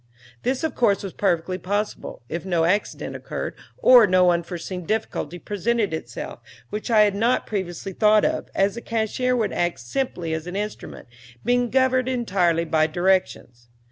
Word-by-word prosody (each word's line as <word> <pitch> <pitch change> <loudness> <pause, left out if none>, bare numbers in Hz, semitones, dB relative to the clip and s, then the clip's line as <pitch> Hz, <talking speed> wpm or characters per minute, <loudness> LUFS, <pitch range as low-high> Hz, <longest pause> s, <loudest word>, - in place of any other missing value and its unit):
This 260 +4 -1
of 320 - -1
course 205 -5 +2
was 195 - -6
perfectly 185 -1 0
possible, 205 - -3
if 170 +6 -4
no 175 -3 +1
accident 200 +5 -1
occurred, - - -5 0.2
or 245 -4 +7
no 180 -1 +5
unforeseen 175 +1 -3
difficulty 175 -4 -2
presented 210 +1 -1
itself, 160 - -6 0.3
which 210 +4 -4
I 220 -2 +5
had 205 -1 +4
not 230 +5 +1
previously 190 -2 -4
thought 215 +1 +4
of, - - -1
as 195 +1 +2
the 235 - -7
cashier 230 +3 0
would 220 -5 0
act 175 0 -1
simply 170 - -3
as 160 +1 -4
an 180 - -5
instrument, 210 +1 -5 0.4
being 245 0 +2
governed 260 0 +2
entirely 185 -9 +1
by 155 -1 +2
my - - -15
directions. 175 -9 0
200 Hz, 165 wpm, -23 LUFS, 175-225 Hz, 0.4 s, or